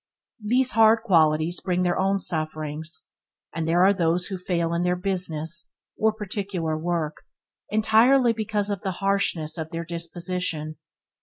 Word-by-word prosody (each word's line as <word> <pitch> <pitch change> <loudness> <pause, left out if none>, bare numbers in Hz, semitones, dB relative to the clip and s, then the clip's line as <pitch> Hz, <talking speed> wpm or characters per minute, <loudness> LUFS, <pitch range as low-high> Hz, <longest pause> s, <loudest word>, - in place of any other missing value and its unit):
These 250 +4 +2
hard 225 0 +5
qualities 160 -4 +3
bring 180 -1 0
their 175 -1 +1
own 195 +1 +2
sufferings, 155 -2 -4 0.4
and 165 -1 -2
there 175 +3 +4
are 200 - +5
those 175 -1 +1
who 190 -2 -5
fail 170 -2 -1
in 170 - 0
their 180 0 +1
business, 175 -3 -2 0.3
or 220 0 +2
particular 195 -6 -3
work, 160 -1 -2 0.5
entirely 230 +4 +4
because 210 -2 -2
of 200 - -3
the 190 -3 -2
harshness 180 -4 0
of 160 0 -4
their 165 0 -5
disposition. 170 -2 -4
180 Hz, 145 wpm, -25 LUFS, 165-200 Hz, 0.5 s, hard